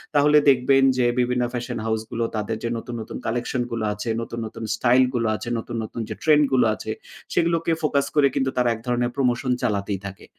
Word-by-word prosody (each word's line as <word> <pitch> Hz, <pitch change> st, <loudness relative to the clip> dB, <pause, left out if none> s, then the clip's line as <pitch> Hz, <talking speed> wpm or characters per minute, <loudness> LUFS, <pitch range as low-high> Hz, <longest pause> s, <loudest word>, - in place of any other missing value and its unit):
তাহলে 145 Hz, +1 st, +5 dB
দেখবেন 135 Hz, +1 st, +4 dB
যে 125 Hz, -, +3 dB
বিভিন্ন 125 Hz, 0 st, +1 dB
ফ্যাশন 120 Hz, -1 st, -4 dB
হাউস 110 Hz, -1 st, 0 dB
গুলো 115 Hz, -, -1 dB
তাদের 110 Hz, +1 st, -2 dB
যে 115 Hz, -, -1 dB
নতুন, 120 Hz, +1 st, -6 dB
নতুন 110 Hz, -, -7 dB
কালেকশন 120 Hz, +2 st, -1 dB
গুলো 115 Hz, -2 st, -2 dB
আছে, 105 Hz, +3 st, -5 dB
নতুন, 115 Hz, 0 st, -6 dB
নতুন 115 Hz, +1 st, -9 dB
স্টাইল 125 Hz, +1 st, +4 dB
গুলো 115 Hz, -2 st, 0 dB
আছে, 110 Hz, -, -7 dB
নতুন, 115 Hz, -, -6 dB
নতুন 110 Hz, +2 st, -6 dB
যে -, -, -4 dB
ট্রেন্ড 150 Hz, -1 st, +5 dB
গুলো 125 Hz, -2 st, +4 dB
আছে। 110 Hz, -, -6 dB, 0.4 s
সেগুলোকে 165 Hz, 0 st, +1 dB
ফোকাস 140 Hz, -2 st, +1 dB
করে 145 Hz, -2 st, +5 dB
কিন্তু 135 Hz, -, +1 dB
তারা 125 Hz, -1 st, +3 dB
এক -, -, -10 dB
ধরনের 120 Hz, 0 st, 0 dB
প্রমোশন 125 Hz, -1 st, +1 dB
চালাতেই 100 Hz, -4 st, -1 dB
থাকে। 95 Hz, -1 st, -8 dB
120 Hz, 200 wpm, -23 LUFS, 115-135 Hz, 0.4 s, তাহলে